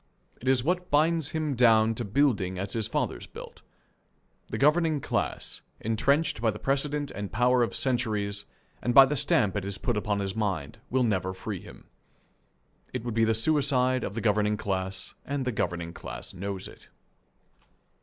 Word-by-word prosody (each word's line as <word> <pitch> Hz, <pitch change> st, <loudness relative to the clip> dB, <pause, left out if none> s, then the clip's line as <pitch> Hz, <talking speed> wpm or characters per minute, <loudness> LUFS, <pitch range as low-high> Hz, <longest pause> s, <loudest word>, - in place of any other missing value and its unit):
It 125 Hz, -, -7 dB
is 130 Hz, -2 st, +3 dB
what 180 Hz, +4 st, -1 dB
binds 155 Hz, +1 st, +2 dB
him 155 Hz, -2 st, -1 dB
down 115 Hz, -3 st, +5 dB
to 120 Hz, -, -4 dB
building 105 Hz, -5 st, +1 dB
as 95 Hz, +1 st, -3 dB
his 110 Hz, -2 st, 0 dB
fathers -, -, -2 dB
built. -, -, -11 dB, 0.9 s
The 110 Hz, -, -3 dB
governing 155 Hz, +3 st, +3 dB
class, -, -, -2 dB, 0.2 s
entrenched 125 Hz, +5 st, +1 dB
by 115 Hz, -, +3 dB
the 105 Hz, -, -3 dB
precedent 140 Hz, +3 st, -1 dB
and 100 Hz, 0 st, -5 dB
power 125 Hz, +2 st, +3 dB
of 120 Hz, -, 0 dB
centuries 105 Hz, -6 st, 0 dB, 0.4 s
and 120 Hz, 0 st, 0 dB
by 135 Hz, -, +11 dB
the 145 Hz, +3 st, -1 dB
stamp 125 Hz, -8 st, +2 dB
it 100 Hz, -, -2 dB
has 100 Hz, 0 st, -3 dB
put 120 Hz, +5 st, -1 dB
upon 105 Hz, -1 st, 0 dB
his 95 Hz, -1 st, -3 dB
mind, 95 Hz, -10 st, -2 dB
will 130 Hz, 0 st, +2 dB
never 95 Hz, -5 st, 0 dB
free -, -, -5 dB
him. -, -, -13 dB, 1.1 s
It 125 Hz, -3 st, -4 dB
would 120 Hz, -2 st, -3 dB
be 115 Hz, 0 st, +3 dB
the 110 Hz, 0 st, +2 dB
suicide 130 Hz, 0 st, +2 dB
of 100 Hz, -, -4 dB
the 115 Hz, -, -2 dB
governing 105 Hz, -1 st, +2 dB
class, 95 Hz, -2 st, -3 dB
and 140 Hz, -1 st, -3 dB
the 125 Hz, -, 0 dB
governing 85 Hz, -5 st, -2 dB
class -, -, -8 dB
knows 95 Hz, 0 st, -5 dB
it. -, -, -13 dB
115 Hz, 175 wpm, -28 LUFS, 100-135 Hz, 1.1 s, by